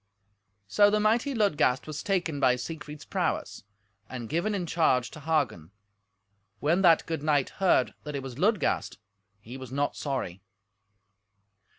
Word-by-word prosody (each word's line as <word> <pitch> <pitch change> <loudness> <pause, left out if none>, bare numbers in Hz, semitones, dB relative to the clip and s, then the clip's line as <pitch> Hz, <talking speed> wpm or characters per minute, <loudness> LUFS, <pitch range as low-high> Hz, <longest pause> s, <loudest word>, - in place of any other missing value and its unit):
So 205 - +4
the 210 +1 +2
mighty 230 +6 +1
Ludgast 150 - +2
was 150 -1 -5
taken 175 -7 -1
by 125 -2 +4
Siegfried's 150 +3 -7
prowess, - - -2 0.5
and 120 -3 -6
given 190 +6 0
in 180 -3 -2
charge 155 -8 +1
to - - -10
Hagen. 145 - -1 0.9
When 165 +6 +2
that 170 -4 +5
good 160 -3 -3
knight 145 -3 +1
heard 175 -9 +3
that 150 -1 -6
it 135 - -4
was 130 0 -8
Ludgast 205 +2 +1 0.4
he 115 +5 -10
was 130 -2 -9
not 140 +2 -1
sorry. 125 - -4
150 Hz, 145 wpm, -28 LUFS, 130-180 Hz, 0.9 s, that